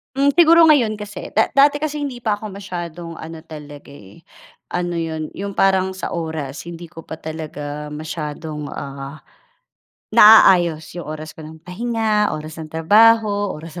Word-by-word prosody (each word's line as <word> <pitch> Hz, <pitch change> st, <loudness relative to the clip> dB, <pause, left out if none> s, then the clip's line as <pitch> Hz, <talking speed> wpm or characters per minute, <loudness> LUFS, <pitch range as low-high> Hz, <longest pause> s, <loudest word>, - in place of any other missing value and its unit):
Hmm, 280 Hz, +1 st, +3 dB
siguro 335 Hz, +1 st, +6 dB
ngayon 235 Hz, -8 st, +4 dB
kasi, 210 Hz, 0 st, -8 dB
da 220 Hz, -, +3 dB
dati 285 Hz, +2 st, +4 dB
kasi 300 Hz, -1 st, -2 dB
hindi 260 Hz, -4 st, -5 dB
pa 210 Hz, -2 st, 0 dB
ako 215 Hz, -, -6 dB
masyadong 175 Hz, -4 st, -7 dB
ano 160 Hz, 0 st, -9 dB
talaga, 145 Hz, -3 st, -11 dB
eh, 100 Hz, -7 st, -15 dB, 0.5 s
ano 175 Hz, -1 st, -2 dB
'yon, 160 Hz, -2 st, -4 dB
yung 200 Hz, +1 st, -5 dB
parang 190 Hz, -1 st, +2 dB
sa 190 Hz, -, -6 dB
oras 160 Hz, -4 st, -5 dB
hindi 170 Hz, 0 st, -9 dB
ko 165 Hz, -1 st, -12 dB
pa 160 Hz, -, -9 dB
talaga 150 Hz, -2 st, -6 dB
masyadong, 150 Hz, -1 st, -6 dB
ah, 140 Hz, +2 st, -7 dB, 0.9 s
naaayos 175 Hz, -7 st, +6 dB
yung 175 Hz, -3 st, -8 dB
oras 155 Hz, 0 st, -7 dB
ko -, -, -14 dB
ng 155 Hz, +1 st, -12 dB
pahinga, 215 Hz, -1 st, -1 dB
oras 155 Hz, +1 st, -8 dB
ng 155 Hz, -, -8 dB
trabaho, 205 Hz, +5 st, +3 dB
oras 165 Hz, +2 st, -9 dB
170 Hz, 155 wpm, -20 LUFS, 155-210 Hz, 0.9 s, siguro